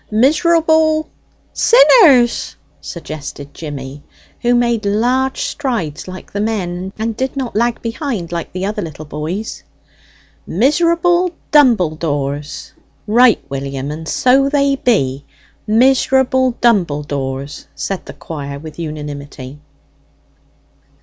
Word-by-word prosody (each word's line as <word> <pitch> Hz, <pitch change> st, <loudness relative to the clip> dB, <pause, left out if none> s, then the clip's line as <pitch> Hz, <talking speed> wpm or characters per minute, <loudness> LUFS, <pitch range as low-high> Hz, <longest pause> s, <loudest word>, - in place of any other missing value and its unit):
miserable 315 Hz, +5 st, +3 dB, 0.2 s
" -, -, -39 dB
"Sinners," 345 Hz, -, +5 dB, 0.3 s
suggested 145 Hz, -3 st, -8 dB
Jimmy, 140 Hz, -2 st, -7 dB, 0.4 s
who 245 Hz, 0 st, +2 dB
made 235 Hz, -2 st, +1 dB
large 245 Hz, +6 st, 0 dB
strides 230 Hz, -, -3 dB
like 185 Hz, 0 st, -9 dB
the 205 Hz, -, -1 dB
men, 190 Hz, -4 st, -3 dB
and 220 Hz, 0 st, -2 dB
did 260 Hz, +3 st, -3 dB
not 255 Hz, -5 st, -3 dB
lag 235 Hz, +2 st, +1 dB
behind 230 Hz, -, -4 dB
like 170 Hz, -1 st, -4 dB
the 185 Hz, +1 st, -3 dB
other 210 Hz, +1 st, -2 dB
little 155 Hz, -3 st, -7 dB
boys. 155 Hz, +9 st, -5 dB, 0.9 s
"Miserable 340 Hz, -, +2 dB, 0.2 s
dumbledores!" 155 Hz, -, +1 dB, 0.3 s
"Right, 235 Hz, +2 st, +4 dB
William, 135 Hz, 0 st, -4 dB
and 160 Hz, +1 st, -7 dB
so 270 Hz, +7 st, +3 dB
they 280 Hz, -1 st, +2 dB
be 140 Hz, -, +1 dB, 0.4 s
miserable 260 Hz, +2 st, +3 dB
dumbledores!" 145 Hz, -, -1 dB
said 195 Hz, -2 st, -4 dB
the -, -, -8 dB
choir 140 Hz, -3 st, -7 dB
with 155 Hz, +3 st, -10 dB
unanimity. 145 Hz, -3 st, -7 dB
210 Hz, 105 wpm, -17 LUFS, -, 0.9 s, Sinners